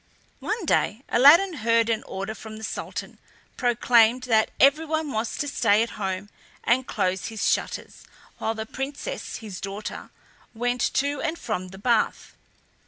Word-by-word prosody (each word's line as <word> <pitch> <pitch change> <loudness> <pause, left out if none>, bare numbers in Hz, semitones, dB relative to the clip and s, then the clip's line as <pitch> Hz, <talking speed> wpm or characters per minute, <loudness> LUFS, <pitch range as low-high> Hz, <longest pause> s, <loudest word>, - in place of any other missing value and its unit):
One 430 -3 -3
day 225 -5 +1
Aladdin 325 +8 +6
heard 230 +1 +2
an 225 -2 0
order 195 +3 -4
from 220 0 -10
the 220 - -10
Sultan - - -5 0.4
proclaimed 240 0 +3
that 220 -3 +3
everyone 310 +2 +3
was 220 -1 -2
to 290 - -2
stay 215 -6 +3
at 230 - -5
home 190 +1 -3 0.3
and 255 +2 +2
close 185 0 -1
his 220 -2 -2
shutters - - -2 0.4
while 225 - -1
the 220 0 -4
Princess 280 - -5
his 205 -5 -8
daughter 200 +2 -6 0.5
went 245 +2 -1
to 285 +1 0
and 330 0 -2
from 200 - -3
the 190 +1 -11
bath. 230 +2 0
230 Hz, 150 wpm, -25 LUFS, 215-275 Hz, 0.5 s, Aladdin